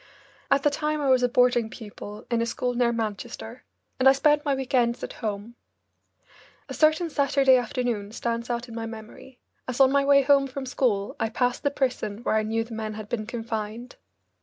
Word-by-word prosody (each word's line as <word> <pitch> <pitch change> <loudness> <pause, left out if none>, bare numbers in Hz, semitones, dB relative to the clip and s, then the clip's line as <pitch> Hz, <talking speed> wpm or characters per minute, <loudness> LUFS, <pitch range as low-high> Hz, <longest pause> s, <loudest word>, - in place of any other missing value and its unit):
At 275 0 +3
the 295 - +3
time 305 +1 -1
I 280 -2 0
was 255 -1 +4
a 245 - +2
boarding 245 -2 +3
pupil 210 -1 -10
in 235 -1 +2
a - - +1
school 245 +1 -2
near 240 -1 +2
Manchester, 210 - -5 0.3
and 265 +1 +7
I - - +7
spent 295 +2 +3
my 285 -3 +1
week 265 -1 -5
ends 235 -2 +2
at - - -5
home. 210 +1 -4 1.1
A - - -7
certain 315 +2 +3
Saturday 275 -3 +3
afternoon 240 -4 -1
stands 235 +1 -3
out 240 +1 -2
in 230 - -10
my 225 0 -4
memory, 225 +3 -11 0.3
as 255 0 -4
on 265 -1 +6
my 280 0 +3
way 275 0 +5
home 275 0 +4
from 270 +1 -6
school 230 -6 0
I 225 - 0
passed 245 +2 0
the 285 - +1
prison 245 -6 -2
where - - 0
I 220 - +3
knew 225 +1 -1
the 230 0 -11
men 215 -1 -4
had 215 -1 -8
been 215 -3 -3
confined. 225 0 -5
245 Hz, 205 wpm, -25 LUFS, 225-270 Hz, 1.1 s, and